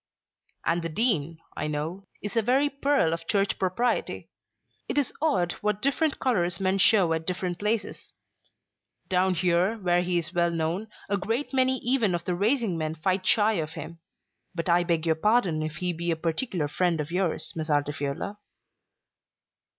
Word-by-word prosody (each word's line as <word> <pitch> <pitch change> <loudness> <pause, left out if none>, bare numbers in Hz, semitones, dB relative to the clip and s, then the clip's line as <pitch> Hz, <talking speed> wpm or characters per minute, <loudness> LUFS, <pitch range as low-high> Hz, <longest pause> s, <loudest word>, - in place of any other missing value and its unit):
"And 170 +1 +1
the 165 - -3
Dean, 165 - +1 0.2
I - - -2
know, 160 +6 -4 0.2
is 205 +3 -4
a 230 - +4
very 265 +6 +2
pearl 280 - +2
of 165 0 -5
Church 200 -1 +1
propriety. 215 +6 -1 0.6
It - - -2
is 285 -3 +1
odd 185 - +2
what 210 -1 0
different 280 +4 +1
colours 180 -9 0
men 190 0 +1
show 185 -4 +5
at 160 0 -3
different 180 -1 -2
places. 210 +1 -2 1.0
Down 185 0 +2
here, 180 +5 +2
where 175 -3 +2
he 180 0 0
is 165 0 -1
well 170 -1 +2
known, 170 +5 -2 0.2
a 200 - 0
great 225 +9 -2
many 260 0 +3
even 235 -7 +2
of 170 - -5
the 180 - 0
racing 205 -1 +1
men 155 0 -2
fight 185 +3 -1
shy 220 0 +5
of 155 0 -5
him. 165 0 -8 0.6
But 170 +1 -2
I 175 +1 +4
beg 170 -2 0
your 165 - +3
pardon 185 -2 +2
if 155 0 -4
he 180 +2 -1
be 170 +1 -3
a 165 - +2
particular 165 - -1
friend 170 +2 0
of 150 +1 -4
yours, 180 -1 -1
Miss 160 0 -4
Altifiorla." 145 +6 -2
180 Hz, 175 wpm, -27 LUFS, 165-210 Hz, 1.0 s, show